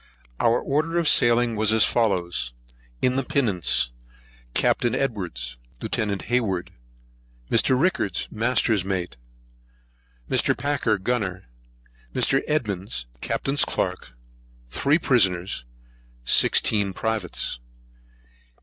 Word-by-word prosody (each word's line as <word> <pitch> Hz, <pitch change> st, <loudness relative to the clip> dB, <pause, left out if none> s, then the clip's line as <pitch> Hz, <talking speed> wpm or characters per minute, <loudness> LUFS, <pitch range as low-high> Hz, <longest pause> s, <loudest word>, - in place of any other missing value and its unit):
Our 115 Hz, +1 st, +3 dB
order 155 Hz, +4 st, -1 dB
of 170 Hz, -2 st, +1 dB
sailing 120 Hz, -3 st, +4 dB
was 110 Hz, 0 st, +2 dB
as 110 Hz, 0 st, +5 dB
follows. 90 Hz, -, 0 dB, 0.5 s
In 130 Hz, +1 st, +2 dB
the 135 Hz, -, +1 dB
Pinnace: 100 Hz, -, +1 dB, 0.6 s
Capt. -, -, +2 dB
Edwards, 95 Hz, -, -2 dB, 0.2 s
Lieut. 100 Hz, -3 st, -2 dB
Hayward, 100 Hz, -8 st, -1 dB, 0.8 s
Mr. 130 Hz, +3 st, +3 dB
Rickards, 140 Hz, -, 0 dB
Master's 115 Hz, -3 st, +1 dB
Mate, 90 Hz, -7 st, -3 dB, 1.1 s
Mr. -, -, +2 dB
Packer, 140 Hz, -7 st, 0 dB
Gunner, 100 Hz, -3 st, -2 dB, 0.7 s
Mr. 135 Hz, -, +2 dB
Edmonds, 100 Hz, -, -2 dB, 0.2 s
Captain's 140 Hz, +1 st, +1 dB
Clerk, -, -, -3 dB, 0.5 s
Three 145 Hz, +3 st, +2 dB
Prisoners, 95 Hz, -, +1 dB, 0.6 s
Sixteen 100 Hz, -, +3 dB
Privates. 105 Hz, -, -3 dB
110 Hz, 95 wpm, -24 LUFS, 90-125 Hz, 1.1 s, as